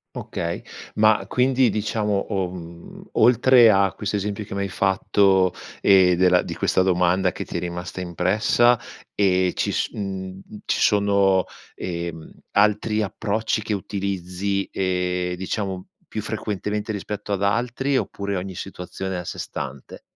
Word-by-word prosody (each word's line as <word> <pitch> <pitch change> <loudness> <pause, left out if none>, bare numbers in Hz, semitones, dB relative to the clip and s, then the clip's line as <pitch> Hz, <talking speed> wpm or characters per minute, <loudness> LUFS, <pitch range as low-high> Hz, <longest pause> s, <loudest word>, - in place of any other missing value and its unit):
Okay. 85 0 -4 0.4
Ma 110 0 +4
quindi 130 -1 +3
diciamo 105 0 -1 0.2
o 95 -3 -1
mhmm, 85 -1 -11
oltre 125 -1 +6
a 100 -1 +3
questo 105 0 -3
esempio 105 +1 -3
che 100 - -8
m'hai 100 0 -2
fatto, 95 -1 +2 0.3
ehm, 95 -2 +5
della 90 0 +4
di - - -6
questa 95 - +2
domanda 90 0 +2
che - - -6
ti - - -4
è - - -3
rimasta 90 +1 -5
impressa, 100 +7 +2 0.4
ehm, 95 -2 +2
ci - - -1
s - - -1
mhmm, 95 -2 -5 0.2
ci - - 0
sono, 100 -2 +3 0.3
ehm, 85 -2 -5 0.2
altri 105 +1 +2
approcci 110 +2 -1
che 110 - -3
utilizzi, 100 0 -2
ehm, 90 -1 -1
diciamo 95 0 -3 0.2
più - - -4
frequentemente 105 +1 -3
rispetto 105 0 -4
ad 100 0 0
altri, 125 +6 0
oppure 100 -5 -2
ogni 95 0 -4
situazione 95 +1 -6
è - - -2
a 90 - -8
sé - - -6
stante? 65 0 -7
95 Hz, 145 wpm, -23 LUFS, 90-105 Hz, 0.4 s, oltre